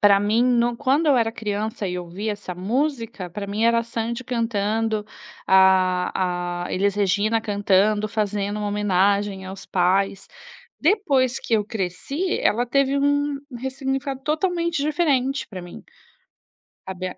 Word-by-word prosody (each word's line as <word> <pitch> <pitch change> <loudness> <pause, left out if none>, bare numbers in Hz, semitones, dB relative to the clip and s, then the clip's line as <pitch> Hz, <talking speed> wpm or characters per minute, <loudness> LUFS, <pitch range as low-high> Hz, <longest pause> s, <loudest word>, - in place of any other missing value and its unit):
para 200 -1 +6
mim, 215 +4 +2
no 240 -1 +2
quando 285 +5 +1
eu 280 -3 +5
era 225 -1 +2
criança 215 -2 -3
e 180 0 -3
ouvia 185 +5 -4
essa 205 -3 -7
música, 230 - -2
para 200 +2 -5
mim 210 +3 -1
era 230 0 +4
a - - -5
Sandy 235 +2 -4
cantando, 225 -2 -1 0.4
a 185 -2 +2
a - - -6
Elis 200 +1 +1
Regina 205 +3 +1
cantando, 205 0 +2
fazendo 205 -1 -2
uma 210 -1 -2
homenagem 200 -1 +1
aos 190 +1 -8
pais. 190 +2 +1 0.5
Depois 285 - +2
que - - -7
eu 210 - +2
cresci, 220 - -3
ela 235 +3 +2
teve 275 +2 +2
um 285 0 +1 0.2
ressignificado 270 +1 -3
totalmente 340 +1 0
diferente 285 -3 +1
para 185 -3 -7
mim, 175 - -11 1.0
sabe, 185 -1 -4
a - - -11
215 Hz, 145 wpm, -23 LUFS, 195-260 Hz, 1.0 s, para